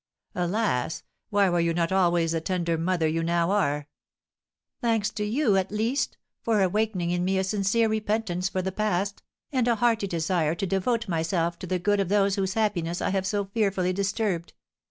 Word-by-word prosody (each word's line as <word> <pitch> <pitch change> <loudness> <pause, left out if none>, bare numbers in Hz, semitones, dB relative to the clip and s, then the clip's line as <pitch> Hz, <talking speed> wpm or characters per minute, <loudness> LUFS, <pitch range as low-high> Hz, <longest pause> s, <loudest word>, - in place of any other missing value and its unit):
"Alas! 175 - -1 0.3
why 200 -1 +3
were 175 -1 +1
you 170 0 +1
not 170 0 0
always 175 -3 +2
the 165 -1 -1
tender 170 -1 -1
mother 165 0 0
you 165 +1 0
now 170 +1 +1
are?" 150 -8 0 0.9
"Thanks 225 -3 +1
to 210 0 -3
you, 215 -1 +2
at 190 0 -1
least, 225 +6 -1 0.2
for 215 -4 +2
awakening 190 -2 0
in 175 0 0
me 190 +1 +1
a 190 - +1
sincere 205 +3 +1
repentance 215 -4 -1
for 185 -1 -2
the 190 - -2
past, 200 -1 -1 0.3
and 255 -4 +1
a 235 - +3
hearty 225 -2 +1
desire 165 -2 0
to 185 - -2
devote 220 +5 0
myself 170 0 -1
to 185 - -6
the 185 +1 0
good 205 +3 +1
of 195 -3 0
those 200 -1 +3
whose 190 -1 -1
happiness 180 -6 0
I - - 0
have 190 -1 0
so 205 0 0
fearfully 195 -3 0
disturbed! 195 -2 -1
190 Hz, 185 wpm, -26 LUFS, 175-210 Hz, 0.9 s, why